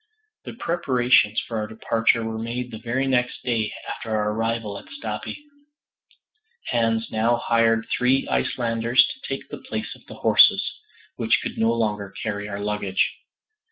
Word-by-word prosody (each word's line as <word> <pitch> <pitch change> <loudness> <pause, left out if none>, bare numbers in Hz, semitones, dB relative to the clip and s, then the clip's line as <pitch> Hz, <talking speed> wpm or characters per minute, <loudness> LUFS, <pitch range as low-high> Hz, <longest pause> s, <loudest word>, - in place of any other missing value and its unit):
The - - -6
preparations 125 - +2
for 115 -2 -2
our 105 - -2
departure 115 +1 +1
were 110 0 -3
made 120 +2 -4
the 110 - -7
very 125 +4 -1
next 125 -2 0
day 115 -3 0 0.2
after 115 - -6
our 105 -1 +1
arrival 115 -2 -2
at - - -16
Stapi; 280 +2 -5 1.3
Hans 115 -1 +1
now 115 +2 +2
hired 115 -1 +2
three 130 +2 +2
Icelanders 115 0 +2
to 260 - -19
take 135 - -4
the - - -7
place 110 0 -5
of - - -17
the - - -9
horses - - +5 0.4
which - - +2
could - - -5
no 115 +1 +3
longer 105 -4 -1
carry 105 -1 -3
our 100 -1 -4
luggage. 100 -2 0
115 Hz, 155 wpm, -24 LUFS, 110-120 Hz, 1.3 s, horses